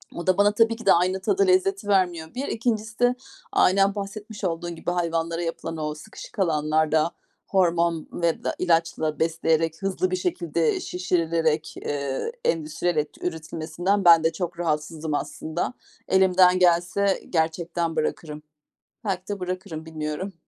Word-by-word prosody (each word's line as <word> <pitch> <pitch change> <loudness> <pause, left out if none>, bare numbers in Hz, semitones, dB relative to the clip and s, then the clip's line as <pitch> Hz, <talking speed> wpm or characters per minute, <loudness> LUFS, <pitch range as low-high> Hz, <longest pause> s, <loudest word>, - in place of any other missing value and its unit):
O 170 - -6
da 185 - +4
bana 205 +1 +5
tabii 225 +1 +3
ki 230 -1 -11
de 195 - +7
aynı 185 +2 +1
tadı 390 - +2
lezzeti 375 - +2
vermiyor 175 -5 +1
1. 270 +3 -3
2'ncisi 220 -1 -2
de 245 0 +4 0.4
aynen 195 +2 +4
bahsetmiş 205 +1 -7
olduğun 170 -1 -2
gibi 165 - -3
hayvanlara 165 -1 -1
yapılan 165 -1 -4
o 150 -1 -2
sıkışık 155 +6 -11
alanlarda 155 -1 +2 0.4
hormon 170 -3 +1
ve 170 -1 -1
da - - -1
ilaçla 165 -3 +1
besleyerek, 165 0 +1
hızlı 190 -1 -1
bir - - +1
şekilde 170 -3 0
şişirilerek, 165 -3 0
eee, 140 - -3
endüstriyel 165 +1 0
et 150 0 -2
üretilmesinden 170 +3 -2
ben 165 -2 +8
de 165 - +3
çok 170 0 -4
rahatsızım 155 -1 -2
aslında. 160 +6 -3 0.3
Elimden 185 -1 +5
gelse 180 +3 +2
gerçekten 165 0 -1
bırakırım. 155 -1 -3 0.6
Belki 190 -2 -2
de 205 -1 -4
bırakırım, 180 -3 -5
bilmiyorum. 160 +4 -4
170 Hz, 140 wpm, -25 LUFS, 160-190 Hz, 0.6 s, ben